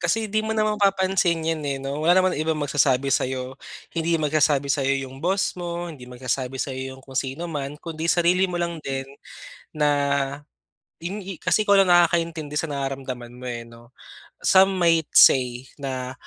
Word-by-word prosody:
Kasi 220 Hz, +6 st, 0 dB
hindi 215 Hz, +2 st, +1 dB
mo 220 Hz, 0 st, -2 dB
na 215 Hz, -, +2 dB
mapapansin 190 Hz, -5 st, +1 dB
'yan 160 Hz, -1 st, -1 dB
eh 140 Hz, -1 st, -1 dB
'no? 140 Hz, +2 st, -4 dB
Wala 175 Hz, +2 st, +5 dB
naman 185 Hz, -1 st, +2 dB
ibang 155 Hz, +1 st, 0 dB
magsasabi 140 Hz, -2 st, +1 dB
sa'yo. 130 Hz, 0 st, -1 dB, 0.4 s
Hindi 165 Hz, 0 st, 0 dB
magsasabi 150 Hz, -2 st, +1 dB
sa'yo 135 Hz, -1 st, 0 dB
'yung 135 Hz, +1 st, -11 dB
boss 190 Hz, +2 st, 0 dB
mo, 175 Hz, 0 st, -4 dB
hindi 125 Hz, -4 st, -12 dB
magsasabi 130 Hz, +1 st, -3 dB
sa'yo 130 Hz, -1 st, -4 dB
'yung -, -, -15 dB
kung 135 Hz, -1 st, -10 dB
sinuman, 145 Hz, +1 st, -3 dB
kundi 165 Hz, 0 st, -5 dB
sarili 175 Hz, +2 st, +3 dB
mo 175 Hz, -, -4 dB
lang 170 Hz, -2 st, -3 dB
din, 135 Hz, -1 st, -4 dB, 0.7 s
na, 150 Hz, -1 st, +2 dB, 1.1 s
in 195 Hz, +5 st, -5 dB
hi 190 Hz, -3 st, -7 dB
kasi -, -, +1 dB
ikaw 200 Hz, -1 st, +5 dB
lang 195 Hz, -2 st, +4 dB
nakakaintindi 165 Hz, -3 st, +1 dB
sa 165 Hz, -, 0 dB
nararamdaman 135 Hz, -3 st, -5 dB
mo 125 Hz, -, -10 dB
eh 120 Hz, -1 st, -4 dB
'no? 115 Hz, +1 st, -17 dB, 0.5 s
Some 190 Hz, 0 st, +4 dB
might 165 Hz, -3 st, +2 dB
say 125 Hz, -1 st, +5 dB
na, 130 Hz, -2 st, -4 dB
150 Hz, 170 wpm, -23 LUFS, 135-175 Hz, 1.1 s, Wala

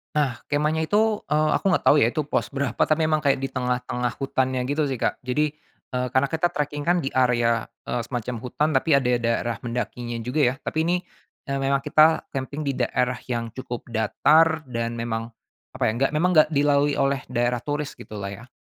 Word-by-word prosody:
Nah 135 Hz, -5 st, 0 dB
kemahnya 155 Hz, +2 st, 0 dB
itu, 215 Hz, 0 st, +2 dB
eee, 155 Hz, 0 st, +2 dB
aku -, -, -14 dB
nggak -, -, +1 dB
tahu -, -, +7 dB
ya 115 Hz, -, +4 dB
itu 150 Hz, +2 st, -2 dB
pos -, -, -1 dB
berapa 135 Hz, -3 st, -3 dB
tapi 155 Hz, 0 st, +2 dB
emang 155 Hz, -1 st, +1 dB
kayak 140 Hz, -2 st, +2 dB
di 135 Hz, -, -3 dB
tengah-tengah 125 Hz, -1 st, -2 dB
hutannya 130 Hz, -2 st, -1 dB
gitu 145 Hz, +1 st, 0 dB
sih, 130 Hz, -, -2 dB
Kak, -, -, -1 dB
jadi, 145 Hz, +4 st, 0 dB, 0.4 s
eee, 125 Hz, 0 st, 0 dB
karena 130 Hz, +2 st, +2 dB
kita 160 Hz, +4 st, 0 dB
tracking 145 Hz, 0 st, -3 dB
kan 175 Hz, +4 st, +2 dB
di 135 Hz, -5 st, -3 dB
area, 120 Hz, -3 st, +2 dB, 0.2 s
eee, 120 Hz, -, -2 dB
semacam 120 Hz, 0 st, -4 dB
hutan 150 Hz, +5 st, -1 dB
tapi 155 Hz, -4 st, +4 dB
ada 130 Hz, -, -1 dB, 0.2 s
daerah 115 Hz, 0 st, 0 dB
mendakinya 120 Hz, 0 st, -4 dB
juga 140 Hz, +5 st, 0 dB
ya -, -, -11 dB
tapi 160 Hz, -, 0 dB
ini, 175 Hz, +1 st, +2 dB, 0.5 s
memang 135 Hz, 0 st, +1 dB
kita 155 Hz, +3 st, +4 dB
camping 140 Hz, +2 st, -4 dB
di 140 Hz, -2 st, -1 dB
daerah 125 Hz, 0 st, 0 dB
yang 115 Hz, -2 st, -3 dB
cukup 120 Hz, 0 st, -7 dB
datar 155 Hz, +8 st, +3 dB
dan 115 Hz, -1 st, -2 dB
memang 115 Hz, 0 st, -4 dB, 0.4 s
apa -, -, -3 dB
ya, -, -, +1 dB
enggak 135 Hz, +2 st, +1 dB
memang 170 Hz, +4 st, +2 dB
enggak 155 Hz, -, +6 dB
dilalui 145 Hz, 0 st, +3 dB
oleh 135 Hz, -1 st, +1 dB
daerah 120 Hz, 0 st, +1 dB
turis 145 Hz, +1 st, -3 dB
gitulah 100 Hz, -2 st, -7 dB
ya. 120 Hz, +6 st, -10 dB
135 Hz, 195 wpm, -24 LUFS, 120-150 Hz, 0.5 s, tahu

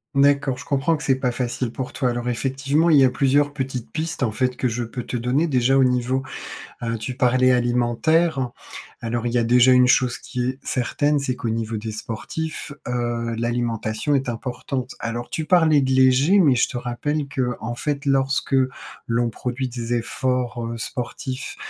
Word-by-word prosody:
D'accord, 140 Hz, -2 st, +3 dB
je -, -, -9 dB
comprends 145 Hz, +4 st, +1 dB
que 150 Hz, -, -7 dB
c'est 135 Hz, -2 st, +2 dB
pas 125 Hz, -2 st, -1 dB
facile 125 Hz, -1 st, -2 dB
pour 130 Hz, 0 st, -5 dB
toi. 125 Hz, -3 st, 0 dB
Alors 120 Hz, 0 st, -3 dB
effectivement, 135 Hz, +7 st, +1 dB
il 145 Hz, -, +7 dB
y -, -, +7 dB
a 130 Hz, -, +5 dB
plusieurs 145 Hz, +3 st, +2 dB
petites 130 Hz, -4 st, -4 dB
pistes 160 Hz, -1 st, -3 dB
en 115 Hz, -4 st, +1 dB
fait 125 Hz, +2 st, 0 dB
que 130 Hz, -, 0 dB
je 120 Hz, +1 st, -2 dB
peux 120 Hz, +2 st, -5 dB
te 120 Hz, -, -4 dB
donner, 125 Hz, +8 st, +1 dB
déjà 130 Hz, -2 st, +2 dB
au 135 Hz, -, +5 dB
niveau, 125 Hz, +1 st, +1 dB, 0.6 s
heu, 115 Hz, 0 st, -1 dB
tu 115 Hz, +4 st, -5 dB
parlais 130 Hz, 0 st, +3 dB
alimentaire. 125 Hz, +4 st, +2 dB, 0.5 s
Alors, 120 Hz, +1 st, -2 dB
il 120 Hz, -, -1 dB
y 120 Hz, -, +2 dB
a 115 Hz, -, +2 dB
déjà 125 Hz, +2 st, +5 dB
une 125 Hz, 0 st, +6 dB
chose 125 Hz, 0 st, +3 dB
qui 125 Hz, -1 st, -4 dB
est 130 Hz, +2 st, -2 dB
certaine, 145 Hz, +3 st, 0 dB
c'est 130 Hz, -2 st, -1 dB
qu'au 125 Hz, -2 st, -4 dB
niveau 110 Hz, -1 st, -2 dB
des 110 Hz, +1 st, -5 dB
sportifs, 135 Hz, +9 st, -5 dB, 0.2 s
heu, 120 Hz, -1 st, -2 dB
l'alimentation 120 Hz, +2 st, -1 dB
est 135 Hz, -2 st, 0 dB
importante. 125 Hz, +2 st, -4 dB
Alors 115 Hz, +1 st, -4 dB
tu 155 Hz, -1 st, -3 dB
parlais 160 Hz, -5 st, +5 dB
de 130 Hz, -1 st, 0 dB
léger, 130 Hz, +8 st, +5 dB
mais 145 Hz, -8 st, +5 dB
je 120 Hz, -, +2 dB
te 125 Hz, -, -6 dB
rappelle 140 Hz, +5 st, -2 dB
qu'en 125 Hz, -3 st, -3 dB
fait, 145 Hz, +2 st, -3 dB
lorsque 135 Hz, 0 st, +1 dB, 0.5 s
l'on 115 Hz, 0 st, +1 dB
produit 125 Hz, +3 st, -3 dB
des 120 Hz, -1 st, -3 dB
efforts, 125 Hz, 0 st, -1 dB
heu, 115 Hz, 0 st, -4 dB
sportifs, 130 Hz, +3 st, -5 dB
125 Hz, 190 wpm, -22 LUFS, 120-135 Hz, 0.6 s, il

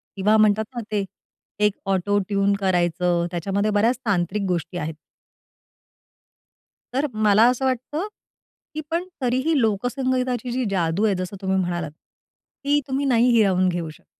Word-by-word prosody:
किंवा 210 Hz, +2 st, +3 dB
म्हणतात 215 Hz, 0 st, +4 dB
ना 240 Hz, -, -2 dB
ते 205 Hz, -2 st, 0 dB, 0.6 s
एक 210 Hz, -, +3 dB, 0.2 s
ऑटो 205 Hz, +2 st, +1 dB
ट्यून 200 Hz, 0 st, +2 dB
करायचं 175 Hz, -2 st, +1 dB
त्याच्यामध्ये 195 Hz, +4 st, -1 dB
बऱ्याच 220 Hz, +5 st, +2 dB
तांत्रिक 195 Hz, -1 st, 0 dB
गोष्टी 175 Hz, -1 st, -2 dB
आहेत. 160 Hz, -1 st, -3 dB, 2.0 s
तर 270 Hz, +3 st, +1 dB
मला 215 Hz, 0 st, +4 dB
असं 255 Hz, +1 st, -1 dB
वाटतं, 265 Hz, -, -2 dB, 0.7 s
की 310 Hz, -, -4 dB
पण 335 Hz, +2 st, 0 dB, 0.2 s
तरीही 260 Hz, +5 st, +1 dB
लोकसंगीताची 250 Hz, +2 st, -1 dB
जी 255 Hz, +1 st, -1 dB
जादू 180 Hz, +2 st, +1 dB
आहे, 205 Hz, -3 st, +2 dB
जसं 185 Hz, +2 st, -4 dB
तुम्ही 190 Hz, 0 st, 0 dB
म्हणालात, 175 Hz, -4 st, -2 dB
ती 285 Hz, -, -5 dB
तुम्ही 275 Hz, +1 st, -1 dB
नाही 245 Hz, -2 st, +3 dB
हिरावून 190 Hz, -5 st, +3 dB
घेऊ 170 Hz, -2 st, -3 dB
शकत. 155 Hz, -, -15 dB
205 Hz, 140 wpm, -23 LUFS, 185-250 Hz, 2.0 s, म्हणतात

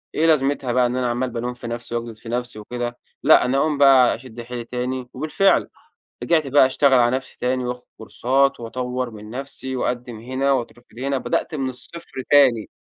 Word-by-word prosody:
إيه 160 Hz, -, +2 dB
لازمتها 140 Hz, -4 st, +2 dB
بقى 125 Hz, 0 st, +3 dB
إن 120 Hz, -, -1 dB
أنا 125 Hz, -1 st, 0 dB
عمّال 125 Hz, +2 st, -1 dB
بالوم 120 Hz, +1 st, -4 dB
في 120 Hz, -1 st, -9 dB
نفسي 120 Hz, 0 st, -5 dB
وأجلد 115 Hz, -1 st, -4 dB
في 115 Hz, +1 st, -11 dB
نفسي 120 Hz, -2 st, -3 dB
وكده، 120 Hz, +2 st, -5 dB, 0.3 s
لأ -, -, +6 dB
أنا 130 Hz, +2 st, +1 dB
أقوم 150 Hz, +1 st, +1 dB
بقى 135 Hz, -3 st, +6 dB
أشد 120 Hz, 0 st, -10 dB
حيلي 120 Hz, 0 st, -6 dB
تاني 125 Hz, +1 st, -4 dB
وبالفعل 155 Hz, +8 st, +2 dB, 0.5 s
رجعت 160 Hz, -4 st, +2 dB
بقى 135 Hz, 0 st, +6 dB
أشتغل 135 Hz, +1 st, +3 dB
على 120 Hz, +1 st, +3 dB
نفسي 130 Hz, 0 st, -6 dB
تاني، 125 Hz, 0 st, -1 dB
وآخد 125 Hz, 0 st, -4 dB
كورسات 135 Hz, +5 st, +1 dB
وأطوّر 125 Hz, +1 st, -4 dB
من 105 Hz, 0 st, -11 dB
نفسي 130 Hz, +1 st, -6 dB
وأقدم 125 Hz, -2 st, -3 dB
هنا 130 Hz, +4 st, -1 dB
وأترفض 120 Hz, -2 st, -4 dB
هنا، 140 Hz, +1 st, -1 dB
بدأت 145 Hz, -, -2 dB
من 135 Hz, -3 st, -1 dB
الصفر 150 Hz, +6 st, -9 dB, 0.2 s
تاني. 130 Hz, -7 st, +5 dB
125 Hz, 185 wpm, -22 LUFS, 120-135 Hz, 0.5 s, لأ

